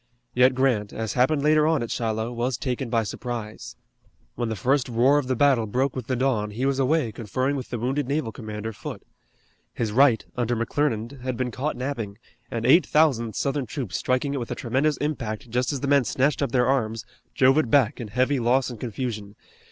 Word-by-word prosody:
Yet 125 +1 +4
Grant, 125 -6 +1
as 110 -1 -3
happened 140 +3 +2
later 155 0 +4
on 160 -6 +2
at 115 - -5
Shiloh, 110 0 -2
was 120 +1 -1
taken 130 -2 -3
by 115 -1 +1
surprise. 110 0 -6 0.6
When 120 -1 -3
the 110 - -2
first 130 +6 +1
roar 125 +5 +4
of 135 - -4
the 130 - 0
battle 130 -4 +3
broke 130 +5 0
with 130 -4 -5
the 130 - 0
dawn 120 -5 0
he 115 +6 -3
was 135 0 +1
away 135 -2 +2
conferring 130 +6 -2
with 130 -3 -5
the 120 - -3
wounded 130 +4 -1
naval 140 -4 -1
commander, 110 -1 -6
Foote. 100 - -8 0.7
His 110 -3 -1
right, 125 -1 +4
under 120 -1 0
McClernand, 120 +1 -1
had 130 -1 -3
been 125 -1 -2
caught 140 +6 -3
napping, 120 -6 -4 0.3
and 115 -1 -3
eight 155 +8 +6
thousand 125 -8 +2
Southern 140 -2 -1
troops 120 - -5
striking 130 +2 0
it - - -2
with 120 - -5
a - - -3
tremendous 135 +5 0
impact 125 -5 -4
just 125 +3 0
as 140 -3 -3
the 140 - -2
men 140 -1 +4
snatched 135 +6 0
up 140 -4 0
their 125 0 +3
arms, 115 -4 0 0.3
drove 135 +3 +5
it 125 - 0
back 130 -1 +3
in 115 - -5
heavy 130 +5 +1
loss 125 +2 +2
and 120 - -9
confusion. 110 -3 -5
125 Hz, 205 wpm, -25 LUFS, 115-140 Hz, 0.7 s, eight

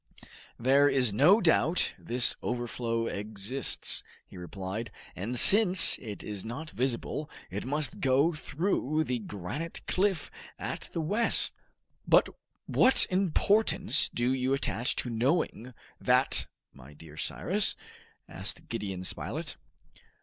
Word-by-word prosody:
"There 135 +4 +4
is 125 -7 +1
no 165 - +5
doubt 165 0 +2
this 120 +1 +1
overflow 120 -1 -3
exists," 110 +5 -3 0.2
he - - -16
repeated, 95 +5 -6 0.3
"and 115 +7 -4
since 195 - +8
it 105 -3 -7
is 105 -2 -5
not 145 +8 -7
visible 130 +4 -3 0.2
it 100 +4 -5
must 145 -1 -2
go 140 +5 +2
through 155 -1 -1
the 125 -5 -2
granite 105 - -6
cliff 190 -4 0 0.3
at - - -6
the 165 - -2
west!" 210 +9 +1 0.5
"But - - +5 0.4
what 260 - +4
importance 195 +2 +1
do 120 +2 0
you 130 +1 0
attach 120 -3 -1
to 125 - -4
knowing 125 0 -1 0.3
that, - - +1 0.3
my 70 +2 -15
dear 75 0 -13
Cyrus?" 75 - 0 0.5
asked - - -7
Gideon 95 -3 -4
Spilett. 95 - -4
130 Hz, 120 wpm, -29 LUFS, 110-160 Hz, 0.5 s, since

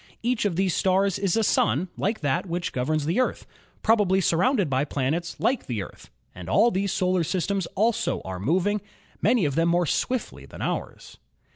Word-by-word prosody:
Each 240 -2 0
of 195 -5 0
these 190 -1 +1
stars 190 0 +2
is 195 0 +1
a 225 - +2
sun 150 - +2
like 215 +3 -2
that 145 +5 0
which 175 +1 -3
governs 145 +4 -1
the 170 +10 0
Earth, 255 - -1 0.4
probably 205 -4 +3
surrounded 195 - +2
by 135 0 +1
planets 150 +5 -2
like 260 +2 0
the 110 -6 -2
Earth, - - -13 0.2
and 90 -1 -9
all 235 - +4
these 195 -1 -1
solar 185 -2 +1
systems 185 +2 -1
also 220 +3 +1
are 95 -1 -5
moving, 185 - +1 0.4
many 235 -8 +3
of 140 - 0
them 165 +3 +2
more 175 +1 +2
swiftly 250 - -2
than - - -12
ours. - - -5
185 Hz, 180 wpm, -25 LUFS, 155-205 Hz, 0.4 s, all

